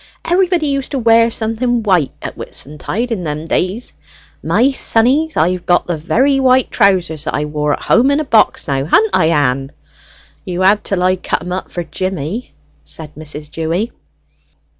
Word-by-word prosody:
Everybody 355 -2 +2
used 275 -2 -1
to - - 0
wear 230 -1 +4
something 230 +1 -1
white 180 -9 +2
at - - -5
Whitsuntide 190 - -5
in 200 -6 -2
them 150 0 -4
days. 185 +8 -2 0.5
My 215 - +2
sonnies, 270 +5 +1
I've 180 +2 0
got 175 0 +3
the 175 - -2
very 265 - +1
white 260 -1 +3
trousers 180 -7 +1
that - - -2
I 150 - -1
wore, 150 0 -1
at - - -5
home 250 +3 +4
in 285 - +2
box 225 -10 +2
now. 135 -1 -1
Ha'n't 215 +7 +3
I, 185 -3 +3
Ann?" 135 -4 +1 0.7
"You 180 0 -4
had 200 +3 +4
till 185 -3 -1
I 185 +1 +2
cut 175 - -2
'em 180 - -6
up 185 +1 -4
for 175 - -4
Jimmy," 185 - -4 0.3
said 150 - -8
Mrs. 150 -1 -8
Dewy. 165 +8 -2
185 Hz, 170 wpm, -16 LUFS, 160-240 Hz, 0.7 s, wear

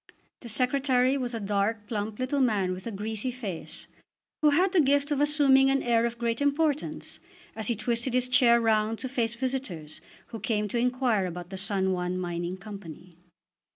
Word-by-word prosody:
The 235 - -9
Secretary 255 +2 +2
was 250 -3 -2
a - - -3
dark, 205 +1 -1
plump 210 -1 -4
little 255 +3 -1
man 205 -8 +1
with 185 +4 -8
a - - -3
greasy 215 +4 -2
face, 220 -9 -6 0.6
who 305 - +5
had 360 +6 +3
the 370 -4 +4
gift 285 +1 +2
of 290 -1 +1
assuming 280 -3 +4
an 270 0 +1
air 235 -1 +2
of 235 0 -7
great 235 +1 -1
importance 290 +1 -1 0.4
as 220 -2 0
he 235 - +2
twisted 235 +3 -1
his 255 0 +2
chair 245 -2 +5
round 220 -1 +1
to 260 - -4
face 235 -3 -1
visitors 235 - -4 0.3
who 225 - -7
came 210 -4 -1
to 235 - -1
inquire 245 -5 +1
about 175 +1 -8
the - - -5
San 190 -1 +1
Juan 180 0 -2
Mining 175 0 -3
Company. 185 -3 -10
235 Hz, 185 wpm, -27 LUFS, 200-260 Hz, 0.6 s, who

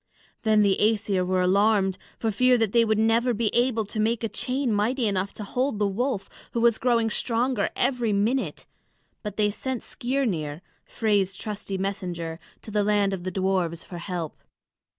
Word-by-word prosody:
Then 215 -1 +4
the 200 -1 +2
Æsir 210 -3 +2
were 185 0 +1
alarmed 195 +1 +3 0.2
for 225 - -1
fear 250 +4 +4
that 225 -4 +1
they 235 +1 +5
would 220 -1 +1
never 230 +2 +2
be 215 0 0
able 240 -3 +2
to 210 +2 -5
make 225 +2 +1
a 225 - 0
chain 255 0 0
mighty 230 +5 +1
enough 195 -1 0
to 215 - -7
hold 250 +3 -1
the 210 - +1
wolf, 200 0 -1 0.3
who 235 - 0
was 230 -1 +3
growing 230 -2 +2
stronger 245 +3 0
every 245 -3 +1
minute; 220 +6 0 0.6
but 210 -2 -6
they 210 -1 +2
sent 260 +3 -4
Skirnir, 195 - -2 0.2
Frey's 200 -4 +1
trusty 205 -1 -5
messenger, 180 -4 -3 0.2
to 215 - -9
the 210 0 +2
land 205 -1 +2
of 180 -2 -5
the - - 0
dwarfs 185 -3 -1
for 175 - -8
help. 170 -3 -4
210 Hz, 175 wpm, -25 LUFS, 195-235 Hz, 0.6 s, they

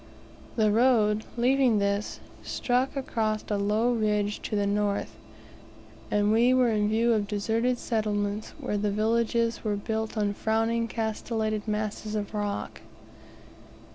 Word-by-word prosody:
The 215 -2 +3
road, 215 -2 +3
leaving 250 -1 +3
this, 200 +1 -1 0.2
struck 255 +3 -1
across 220 -5 -1
a 205 - +1
low 215 +4 +2
ridge 210 -2 0
to 215 - -3
the 205 -1 +1
north; 205 0 -1 0.9
and 205 0 +2
we 240 +3 +4
were 250 -2 +4
in 210 -1 +1
view 230 +2 +3
of 210 -2 0
deserted 225 +4 0
settlements 210 -2 -2
where 205 - -2
the 205 0 0
villages 230 +2 0
were 210 -2 0
built 220 +2 -3
on 205 -1 +1
frowning 225 +2 0
castellated 220 -1 -2
masses 215 0 -3
of 210 0 -3
rock. 205 -1 -3
215 Hz, 135 wpm, -27 LUFS, 210-230 Hz, 0.9 s, we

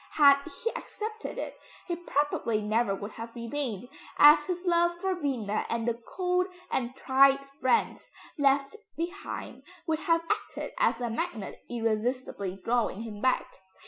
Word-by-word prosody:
Had 280 -2 +7 0.2
he 465 - +1
accepted 435 +1 -6
it, - - -5 0.3
he 345 - -2
probably 290 -9 0
never 215 0 +1
would 205 +2 -6
have 230 +2 -8
remained, 240 -2 -3 0.3
as 295 0 +8
his 360 0 -3
love 345 0 +2
for 380 +1 0
Vienna 255 - -1
and 230 0 -1
the 235 0 -1 0.2
old 365 0 +2 0.2
and 250 0 -1
tried 275 +1 +4
friends 275 - 0 0.3
left 275 +3 +2 0.2
behind 340 -6 -5 0.2
would 315 -2 0
have 330 0 +2
acted 420 0 -3
as 230 - +2
a 240 -1 -1
magnet 230 - -4
irresistibly 225 -3 -1
drawing 230 -3 0
him 210 -3 -7
back. 255 -1 +2
270 Hz, 145 wpm, -29 LUFS, 230-340 Hz, 0.3 s, as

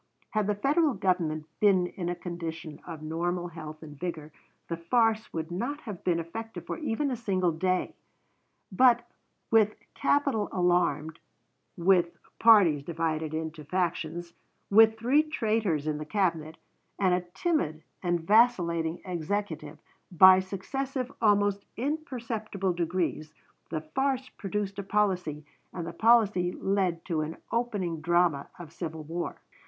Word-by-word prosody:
Had 215 -3 0
the 210 - +1
Federal 285 +6 +2
Government 165 -5 0
been 195 -4 +4
in 175 -1 -4
a 175 - -1
condition 165 -3 -6
of 160 -3 -7
normal 175 +3 -2
health 155 -1 -9
and 150 -2 -11
vigor, 160 -4 -5 0.4
the 165 - -2
farce 225 +5 +1
would 160 +1 -4
not 250 +12 -3
have 205 -6 -8
been 170 -2 +1
effective 225 +7 -7
for - - -5
even 285 -1 -1
a - - 0
single 190 -6 0
day; 185 +3 0 0.8
but, 240 +3 +4 0.4
with 215 -2 +4 0.2
capital 275 -7 +1
alarmed, 170 -4 +1 0.6
with, 175 -1 +3 0.2
parties 200 -10 +6
divided 160 0 -2
into 160 -1 -5
factions, 175 0 -2 0.4
with 220 +1 +7
three 250 +7 +4
traitors 220 - 0
in 150 -1 -1
the - - -4
Cabinet, 165 -4 -1 0.4
and 190 -3 +3
a 180 - +2
timid 170 - 0 0.2
and 175 -2 0
vacillating 170 -5 +3
Executive, 170 -3 -3 0.3
by 185 +2 +8
successive, 255 +8 -4
almost 205 -2 +3
imperceptible, 230 - -2
degrees, 165 -3 -2 0.3
the 155 -1 -3
farce 260 - -1
produced 200 0 -4
a - - -3
policy 185 -7 0 0.3
and 170 -2 -5
the 170 - -6
policy 210 -4 +4
led 190 -4 -1
to 165 -4 -1
an 155 +1 -4
opening 205 -9 -1
drama 170 -3 +2
of 165 -2 -10
civil 160 -2 -5
war. 170 +3 -4
180 Hz, 135 wpm, -28 LUFS, 165-215 Hz, 0.8 s, by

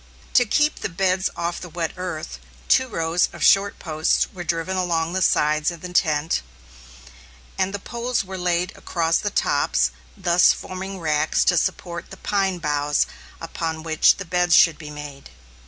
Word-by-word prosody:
To 245 - +5
keep 300 +7 +1
the - - -3
beds 185 +1 0
off 170 0 -3
the 180 - -8
wet 165 0 -3
earth, 160 - -5 0.3
two 260 - +4
rows 165 -5 0
of - - -6
short 200 +1 +4
posts 155 -2 +1
were 180 -2 -6
driven 170 +2 -2
along 170 -2 0
the 190 - -1
sides 155 -2 +2
in 170 -2 -8
the 180 -1 -8
tent, 155 - +1 1.1
and 195 +1 -2
poles 235 -1 -2
were 190 0 -8
laid 180 0 -1
across 165 -1 0
the 205 - -2
tops, - - +1 0.3
thus 175 -2 +4
forming 190 +1 -7
racks 155 -1 +1
to 180 - +3
support 170 0 -2
the 195 - -10
pine 195 -2 0
boughs 150 -2 0 0.3
upon 160 -1 -4
which 160 -1 +4
the 195 - -6
beds 175 -1 +2
should 165 -3 +5
be 155 -2 -8
made. 145 -2 -9
175 Hz, 165 wpm, -22 LUFS, 160-190 Hz, 1.1 s, To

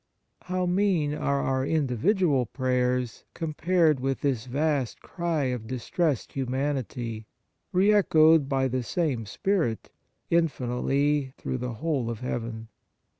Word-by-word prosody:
How 185 0 -1
mean 180 -5 +1
are 140 -2 0
our 130 0 0
individual 145 - +1
prayers 125 -2 -1
com 160 -2 -3
pared 165 -3 +3
with 135 +1 -2
this 130 -5 -1
vast 140 -1 0
cry 170 -4 -2
of 125 -4 -2
distressed 130 +3 -1
humanity, 125 -4 -3 0.4
re 195 +3 +4
echoed 160 -7 +5
by 135 -1 +2
the 130 0 -1
same 125 - -1
Spirit 160 - -1 0.4
infinitely 140 -2 +1
through 130 - -3
the 125 0 -3
whole 140 -2 -1
of 115 -1 -5
heaven 115 -3 -4
135 Hz, 125 wpm, -27 LUFS, 125-160 Hz, 0.4 s, echoed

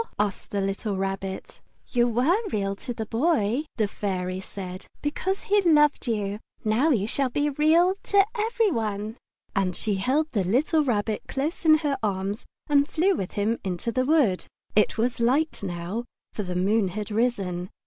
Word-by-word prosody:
asked 205 -2 -1
the 200 - -1
little 195 +1 -2
Rabbit. 195 0 -4 0.3
"You 240 -1 +3
were 250 +9 +3 0.2
Real 200 -2 -1
to 245 - -5
the 225 -2 -4
Boy," 245 +1 +1
the 215 -3 +2
Fairy 185 -3 -3
said, 185 -1 -8 0.2
"because 375 +6 -1
he 410 0 +3
loved 295 -6 +4
you. 205 -3 -1 0.3
Now 225 +9 +3
you 220 -9 +2
shall 265 +4 0
be 290 +4 0
Real 320 +6 +4
to 395 -1 +4
every 450 -1 +1
one." 225 -7 0
The 200 0 -4
Fairy 215 - -4 0.4
Flower 195 - +2
And 180 -2 -2
she 210 -2 -1
held 285 +10 +1
the 205 -4 +1
little 290 - +2
Rabbit 215 -5 0
close 300 +6 -3
in 310 -1 +7
her 280 -2 0
arms 200 +1 -2 0.2
and 285 -1 +4
flew 370 +5 +2
with 190 - -4
him 215 +3 0
into 190 +4 -2
the 255 +2 +1
wood. 270 - +3 0.3
It 210 - +3
was 240 +2 0
light 270 +7 +1
now, 185 +5 -4 0.3
for - - -3
the 180 -3 -4
moon 200 +3 +2
had 210 +3 -5
risen. 195 -6 -1
225 Hz, 180 wpm, -26 LUFS, 195-290 Hz, 0.4 s, in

